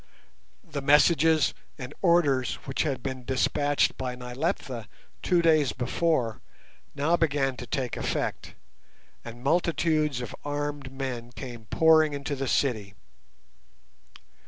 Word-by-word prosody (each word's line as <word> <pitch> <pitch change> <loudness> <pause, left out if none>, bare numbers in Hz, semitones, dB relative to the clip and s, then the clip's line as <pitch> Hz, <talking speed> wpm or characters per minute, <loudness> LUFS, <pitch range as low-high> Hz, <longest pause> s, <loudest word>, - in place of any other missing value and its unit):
The 155 -7 -5
messages 155 +2 +4 0.2
and 130 +2 -7
orders 155 -8 +3
which 135 - -2
had 140 -4 -2
been 130 -2 -4
despatched 145 +3 +1
by 125 -1 -3
Nyleptha 125 -2 -4 0.3
two 175 -2 +2
days 155 -7 +3
before 125 -2 0 0.5
now 150 +4 +2
began 145 -5 +1
to 125 - -7
take 125 +1 -2
effect, - - -3 0.7
and 120 +1 -10
multitudes 155 -2 +1
of 120 - -6
armed 145 -1 -4
men 125 -3 -5
came 120 -4 -8
pouring 155 +3 +4
into 140 0 -3
the 135 0 -3
city. 110 -5 0
140 Hz, 115 wpm, -27 LUFS, 125-155 Hz, 0.7 s, messages